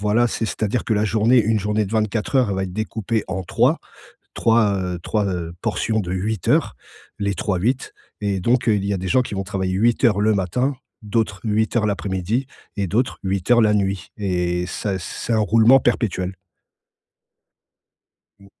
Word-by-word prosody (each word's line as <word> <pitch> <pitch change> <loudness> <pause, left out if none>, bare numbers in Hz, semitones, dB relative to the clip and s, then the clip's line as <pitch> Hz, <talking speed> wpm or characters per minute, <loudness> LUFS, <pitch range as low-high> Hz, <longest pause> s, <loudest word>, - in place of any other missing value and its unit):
Voilà, 105 +4 +3
c'est 115 - -2
c'est-à-dire 110 +2 -2
que - - -1
la 105 0 +1
journée 115 +4 +4
une 110 0 +1
journée 105 +1 0
de 95 - -9
24 110 +4 0
heures, 125 -5 +3
elle 95 - -1
va 95 - -1
être 90 - -6
découpée 110 0 -2
en 95 +1 -3 0.7
3-3, 110 -3 +1
heu, 90 -1 -3
3, 105 -2 0 0.4
portions 110 0 0
de 90 -2 -5
8 100 +1 -3
heures, - - +2 0.4
les 100 -1 0
trois 95 +1 -1
huit 125 +7 -1 0.3
et 100 -2 0
donc 120 +4 +1
heu, 110 - +4
il 100 -1 -1
y 100 - 0
a - - -1
des 95 +1 -4
gens 130 - +4
qui 110 - -7
vont 95 - -2
travailler 95 -1 -2
8 115 +7 +2
heures 105 -3 +3
le 110 +1 +3
matin 115 +9 0 0.3
d'autres 105 -2 -1
8 110 +1 0
heures 115 -3 +2
l'après-midi 100 +5 -2 0.3
et 100 -2 0
d'autres 120 +8 0
8 95 +2 -1
heures 120 -1 +6
la 105 -1 +4
nuit 95 -2 -1
et 90 -3 -1
ça 95 0 -3
c'est 100 +6 -4
un 110 - +3
roulement 115 +5 +5
perpétuel. 95 -6 0 2.1
Mmh. 100 - -18
105 Hz, 185 wpm, -21 LUFS, 95-115 Hz, 2.1 s, heures